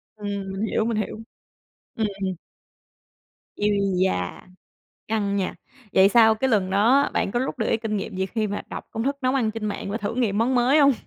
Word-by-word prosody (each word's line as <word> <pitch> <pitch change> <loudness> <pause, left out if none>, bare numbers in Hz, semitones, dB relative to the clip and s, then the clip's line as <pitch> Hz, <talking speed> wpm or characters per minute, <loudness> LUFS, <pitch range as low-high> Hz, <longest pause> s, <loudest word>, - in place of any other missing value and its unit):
Ừm, 200 -2 -4
mình 195 +1 -5
hiểu, 220 0 0
mình 230 -2 -1
hiểu. 215 0 -3 0.8
Ừm. 220 -2 0 1.5
Ui 210 0 +1 0.4
da, 90 - -3 0.7
căng 205 -2 0
nha. 190 -2 -1 0.4
Vậy 190 +1 +6
sau 220 0 +6
cái 265 +5 0
lần 190 -4 +2
đó 235 +8 +4
bạn - - 0
có 240 - +1
rút 260 - -3
được 220 - 0
cái - - +2
kinh 220 -2 -3
nghiệm 195 -1 -4
gì 190 0 0
khi 220 +1 -1
mà 205 0 -4
đọc - - -7
công 225 - -3
thức 280 +2 0
nấu 255 +1 +2
ăn 230 -5 +1
trên 225 -1 -6
mạng 200 -1 -4
và 215 - -2
thử 210 0 -3
nghiệm 220 -5 0
món 250 +3 +2
mới 250 +5 +4
hông? 280 -1 +6
220 Hz, 205 wpm, -24 LUFS, 200-240 Hz, 1.5 s, Vậy